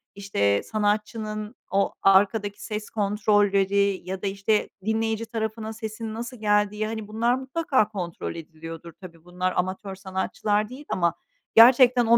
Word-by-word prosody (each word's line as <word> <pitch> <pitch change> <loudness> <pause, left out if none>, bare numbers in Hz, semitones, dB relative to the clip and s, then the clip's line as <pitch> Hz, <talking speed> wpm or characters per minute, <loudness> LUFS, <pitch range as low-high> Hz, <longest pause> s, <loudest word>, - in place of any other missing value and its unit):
işte, 100 - +1
sanatçının 215 +1 -2 0.2
o 200 0 +1
arkadaki 205 +1 +3
ses 210 -1 -5
kontrolleri 200 -2 +2
ya 185 0 -5
da, - - -1
işte, 200 +2 0 0.2
dinleyici 225 0 0
tarafına 220 -1 -4
sesinin 220 0 -6
nasıl 235 +2 -6
geldiği. 210 0 +1
Hani, 220 -1 -5
bunlar 230 +3 +1
mutlaka 265 -3 +1
kontrol 180 -6 -5
ediliyordur 165 0 -9
tabii. 170 -3 -12
Bunlar 180 +1 -2
amatör 190 +2 -2
sanatçılar 200 +2 -1
değil 270 +4 -10
ama 170 -2 +1 0.4
gerçekten 245 +1 +7
o 230 +1 +6
210 Hz, 135 wpm, -25 LUFS, 195-220 Hz, 0.4 s, gerçekten